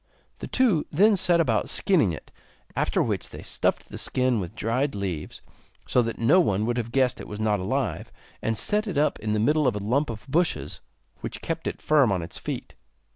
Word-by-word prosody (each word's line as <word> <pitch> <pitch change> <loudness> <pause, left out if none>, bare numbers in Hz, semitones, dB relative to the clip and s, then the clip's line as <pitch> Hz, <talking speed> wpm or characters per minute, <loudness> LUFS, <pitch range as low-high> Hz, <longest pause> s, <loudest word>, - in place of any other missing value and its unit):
The - - -6
two 225 -12 +2
then 205 +7 +4
set 175 -2 +3
about 165 - +1
skinning 160 - +2
it, 80 - -9 0.4
after - - +1
which - - -2
they - - -9
stuffed - - -1
the - - -6
skin 125 -3 +1
with 95 +2 -6
dried 120 +5 -1
leaves, 95 -6 -4 0.4
so 125 - +3
that 115 -1 -3
no 145 +11 +4
one 105 - +2
would 120 +1 -1
have 115 -1 -3
guessed 130 -1 +1
it - - -9
was 105 - -7
not 105 -2 +1
alive, 125 +6 -2 0.3
and 115 -1 0
set 210 - +1
it 185 -7 -3
up 150 +1 +2
in 105 0 -2
the 105 - +1
middle 150 +6 +3
of 120 - +1
a 100 -1 -4
lump 140 +6 +1
of 110 +2 -7
bushes, 165 +5 0 0.4
which - - -6
kept - - -3
it - - -5
firm 145 -7 +4
on 90 -3 0
its 85 - -6
feet. - - -5
125 Hz, 210 wpm, -25 LUFS, 105-155 Hz, 0.4 s, then